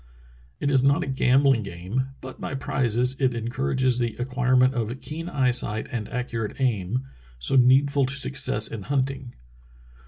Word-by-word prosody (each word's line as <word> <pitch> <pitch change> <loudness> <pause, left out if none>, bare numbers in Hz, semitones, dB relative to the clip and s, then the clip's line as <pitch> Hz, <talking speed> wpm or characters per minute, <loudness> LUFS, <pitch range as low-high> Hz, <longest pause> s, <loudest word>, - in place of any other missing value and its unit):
It 145 - 0
is 135 -2 +3
not 140 +1 +3
a - - -6
gambhng 135 -2 +3
game, 100 +8 -4
but 130 0 -10
by - - -4
prizes 125 -1 0
it 130 -2 +2
encourages 120 - 0
the 120 -2 -1
acquirement 125 +1 +2
of 120 +1 -3
keen 155 +6 -7
eyesight 125 -7 +1
and 115 -5 -4
accurate 115 -2 -4
aim, 120 -1 -1 0.3
so - - +1
needful 135 +2 +4
to 135 - -2
success 135 -6 +2
in 110 - -7
hunting. 135 +1 -3
125 Hz, 150 wpm, -24 LUFS, 115-135 Hz, 0.3 s, needful